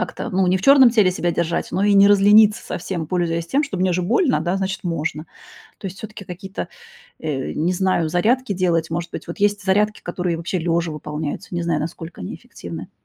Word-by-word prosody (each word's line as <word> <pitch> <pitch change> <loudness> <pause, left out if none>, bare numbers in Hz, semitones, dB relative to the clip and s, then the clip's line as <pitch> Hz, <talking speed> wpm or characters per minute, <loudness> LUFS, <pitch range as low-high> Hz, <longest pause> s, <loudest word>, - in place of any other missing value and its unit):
как-то, - - -4
ну, 185 0 +1
не 185 - +3
в 185 - -6
чёрном 275 -3 +7
теле 215 -6 +4
себя 175 -1 -1
держать, 170 0 -1
но 190 - 0
и 205 - +4
не 200 0 +7
разлениться 205 +1 +5
совсем, 175 -2 -4
пользуясь 170 -1 -1
тем, 280 - +1
что 245 -9 -5
мне 185 0 +2
же 180 +1 0
больно, 220 - +2
значит, 190 -1 -3
можно. 160 -2 -3 0.5
То 195 - -7
есть 190 +1 -7
всё-таки 215 -1 -9
какие-то, 190 +2 -7 0.5
э, 140 -4 -3
не 170 +4 0
знаю, 180 -3 +1
зарядки 220 +8 +1
делать. 170 -3 0
Может 170 +1 -3
быть, - - -7
вот 170 - -6
есть 205 0 +1
зарядки, 210 +2 +1
которые 175 -1 -2
вообще 170 +2 -3
лёжа 170 0 -1
выполняются. 150 +4 -5
Не 175 - -1
знаю, 170 - 0
насколько 165 +2 -7
они - - -6
эффективны. 85 +1 -9
180 Hz, 200 wpm, -21 LUFS, 165-200 Hz, 0.5 s, чёрном